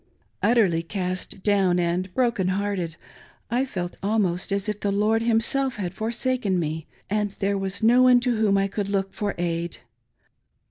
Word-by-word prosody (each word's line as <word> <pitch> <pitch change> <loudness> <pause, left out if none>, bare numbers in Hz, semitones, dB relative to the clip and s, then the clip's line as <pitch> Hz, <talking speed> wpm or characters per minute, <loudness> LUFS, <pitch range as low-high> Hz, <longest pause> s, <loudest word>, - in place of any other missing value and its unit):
l/tterly 200 -9 +3
cast 185 0 -4
down 195 -4 +3
and 175 +2 0
broken 235 -7 +1
hearted, 185 -3 -1 0.6
I 250 +3 +2
felt 180 -9 -5
almost 195 -3 0
as 200 +1 -1
if 210 -1 -2
the 205 - -1
Lord 210 +3 +2
himself 235 +4 +2
had 185 -4 -4
forsaken 230 -2 -1
me, 160 -1 -3 0.2
and 210 0 0
there 200 0 0
was 195 +2 -3
no 240 +3 +6
one 250 -1 +6
to 245 -1 +1
whom 210 -2 +3
I 195 0 +2
could 200 0 -3
look 195 -1 -1
for 205 -1 -2
aid. 170 -2 -2
200 Hz, 160 wpm, -24 LUFS, 185-225 Hz, 0.6 s, no